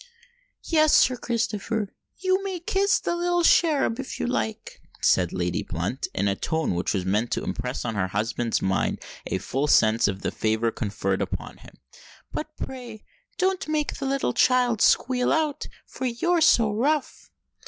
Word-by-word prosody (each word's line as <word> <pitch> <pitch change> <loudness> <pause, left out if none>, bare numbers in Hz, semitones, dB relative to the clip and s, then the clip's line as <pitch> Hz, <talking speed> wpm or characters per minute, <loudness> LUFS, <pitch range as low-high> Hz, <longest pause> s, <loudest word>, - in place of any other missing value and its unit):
"Yes, 310 -2 +4
Sir 255 - +5
Christopher—you 230 - -2
may 380 -3 -3
kiss 390 +3 +1
the 345 - -2
little 350 0 +1
cherub, 295 -8 +3
if 270 - -6
you - - -1
like," 240 -3 -3 0.2
said 90 -2 +3
Lady 90 -1 -1
Blunt, 90 +10 -3
in 100 - +1
a 100 - +1
tone 160 - -1
which 90 +4 -1
was 95 -2 -2
meant 105 +5 0
to - - -2
impress 125 +2 -4
on 115 - -2
her 95 -3 0
husband's 115 +4 -1
mind 95 0 0 0.3
a - - -1
full 135 +9 -2
sense 110 -4 +4
of 95 -1 -4
the - - -1
favour 110 +1 0
conferred 100 -4 -2
upon - - -5
him: - - -16 0.6
"but - - -4
pray 245 -5 -7 0.3
don't 375 -2 0
make 305 -1 -1
the 275 0 -1
sweet - - -1
child 250 -3 +3
squeal 250 0 +3
out—for 300 -4 -2
you're 335 +9 +1
so 230 -9 +4
rough." 280 +6 -1
225 Hz, 160 wpm, -25 LUFS, -, 0.6 s, Sir